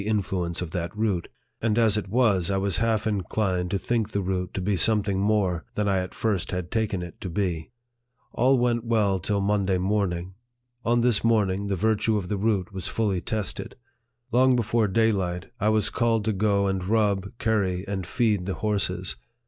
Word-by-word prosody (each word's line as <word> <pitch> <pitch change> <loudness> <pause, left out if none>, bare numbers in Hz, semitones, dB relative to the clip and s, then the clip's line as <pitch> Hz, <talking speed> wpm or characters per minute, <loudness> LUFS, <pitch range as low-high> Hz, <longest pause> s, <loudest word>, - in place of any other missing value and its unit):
71 105 +2 +1
influence 90 -4 -2
of 80 - -6
that 85 +3 -4
root; 105 -6 0 0.3
and 110 -1 +1
as 110 -3 +4
it 105 -2 -2
was, 100 -6 +2
I 100 - +1
was 95 0 0
half 115 -1 +1
in 105 -3 0
clined 90 -3 -1
to 100 - 0
think 110 +1 -1
the 100 -2 -2
root 90 -1 -2
to - - -1
be 100 +2 0
something 100 +1 +3
more 100 -4 +1
than 105 - 0
1 100 -1 +2
at 95 -1 -2
first 105 -6 -1
had 90 -1 -4
taken 110 -5 -1
it 85 - -10
to 95 - -4
be. 85 -3 -2 0.6
All 130 +3 +3
went 120 -1 +1
well 105 -5 +1
till 100 +3 -1
Mon 100 -1 +1
day 95 -2 +2
morning. 95 -2 -1 0.5
On 120 +1 +2
this 120 -3 +2
morning, 100 -4 +2
the 100 - 0
virtue 110 +2 +1
of 90 -3 -4
the 105 - -1
root 100 -2 0
was 95 -2 -4
fully 100 -5 0
tested. 110 0 -3 0.6
Long 130 +1 +4
before 115 -1 +1
daylight, 95 -3 0
I 105 - +2
was 110 -1 +1
called 115 -3 +1
to 110 - +1
go 100 0 +2
and 95 -2 -1
rub, 100 +1 0
curry, 100 -5 0
and 95 -3 -3
feed, 105 -6 +1
the 95 - -2
horses. 95 -3 -1
100 Hz, 195 wpm, -25 LUFS, 95-110 Hz, 0.6 s, as